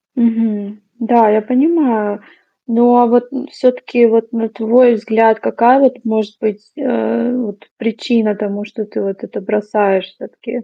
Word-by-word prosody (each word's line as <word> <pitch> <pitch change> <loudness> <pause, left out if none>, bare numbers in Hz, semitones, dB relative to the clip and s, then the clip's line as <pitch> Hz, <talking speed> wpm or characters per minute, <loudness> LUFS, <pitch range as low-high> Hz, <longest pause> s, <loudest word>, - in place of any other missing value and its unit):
Мгм, 220 -3 -1 0.2
да, 230 -2 +3
я 215 +1 +2
понимаю. 250 -6 0 0.5
Но 240 +1 +4
вот 245 +1 +1
н 275 +1 -6
всё-таки, 250 -2 +1
вот 225 +1 +1
на 225 -1 -2
твой 230 +3 +3
взгляд, 225 0 +2
какая 245 +4 +3
вот 260 -2 +3
может 220 -2 -2
быть, 210 -1 -4
а, 115 - -1
вот 210 -4 -6
причина 225 -2 -1
тому, 205 0 -5
что 215 0 -7
ты - - -6
вот 195 -1 -5
это - - -8
бросаешь 205 -2 0
всё-таки? 230 +5 -10
225 Hz, 145 wpm, -15 LUFS, 210-245 Hz, 0.5 s, Но